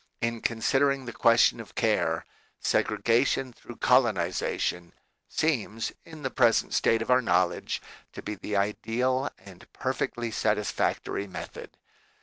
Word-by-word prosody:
In 115 Hz, -1 st, -2 dB
considering 135 Hz, +4 st, +1 dB
the 120 Hz, -, -6 dB
question -, -, +4 dB
of -, -, -10 dB
care, -, -, +1 dB, 0.3 s
segregation 125 Hz, +2 st, +1 dB
through 120 Hz, 0 st, -12 dB
colonization 90 Hz, -7 st, +1 dB, 0.4 s
seems 115 Hz, -8 st, -1 dB
in 160 Hz, -3 st, -12 dB
the 130 Hz, -, -2 dB
present 120 Hz, -3 st, +3 dB
state 115 Hz, 0 st, +3 dB
of 125 Hz, -, -2 dB
our 125 Hz, 0 st, +5 dB
knowledge 90 Hz, -4 st, 0 dB, 0.3 s
to -, -, -8 dB
be 105 Hz, -, -4 dB
the 105 Hz, +1 st, -5 dB
ideal 120 Hz, +6 st, 0 dB
and 95 Hz, -2 st, -15 dB
perfectly 120 Hz, -1 st, -2 dB
satisfactory 105 Hz, -1 st, -1 dB
method. 90 Hz, -2 st, -9 dB
115 Hz, 125 wpm, -27 LUFS, 105-130 Hz, 0.4 s, our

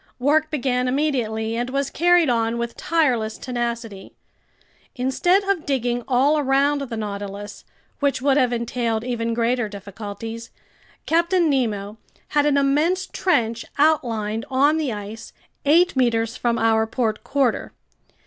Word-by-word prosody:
Work 305 Hz, +4 st, +2 dB
began 255 Hz, -4 st, 0 dB
immediately 240 Hz, -6 st, -1 dB
and 240 Hz, +2 st, -2 dB
was 275 Hz, +1 st, -2 dB
carried 350 Hz, 0 st, +4 dB
on 230 Hz, -1 st, +1 dB
with 235 Hz, 0 st, -4 dB
tireless 255 Hz, -10 st, 0 dB
tenacity. 235 Hz, -5 st, -5 dB, 0.8 s
Instead 285 Hz, +10 st, +2 dB
of 390 Hz, -5 st, 0 dB
digging 245 Hz, -4 st, -1 dB
all 275 Hz, +4 st, +3 dB
around 280 Hz, +1 st, +2 dB
the 240 Hz, -5 st, -5 dB
Nautilus, 205 Hz, -1 st, -6 dB, 0.4 s
which 280 Hz, -2 st, +1 dB
would 275 Hz, +1 st, +2 dB
have 255 Hz, -4 st, +3 dB
entailed 235 Hz, -1 st, -1 dB
even 230 Hz, -2 st, -2 dB
greater 235 Hz, -1 st, 0 dB
difficulties, 205 Hz, +3 st, -8 dB, 0.6 s
Captain 340 Hz, 0 st, +2 dB
Nemo 215 Hz, -6 st, -1 dB, 0.3 s
had 295 Hz, -1 st, +2 dB
an 285 Hz, -1 st, +3 dB
immense 305 Hz, +7 st, +2 dB
trench 235 Hz, -13 st, 0 dB
outlined 230 Hz, -8 st, +1 dB
on 285 Hz, +4 st, +3 dB
the 300 Hz, -5 st, -1 dB
ice, 210 Hz, +1 st, -8 dB, 0.3 s
eight 335 Hz, +4 st, +4 dB
meters 230 Hz, -2 st, +1 dB
from 235 Hz, -1 st, 0 dB
our 220 Hz, -1 st, +2 dB
port 220 Hz, -2 st, -2 dB
quarter. 260 Hz, -1 st, 0 dB
245 Hz, 130 wpm, -22 LUFS, 225-285 Hz, 0.8 s, carried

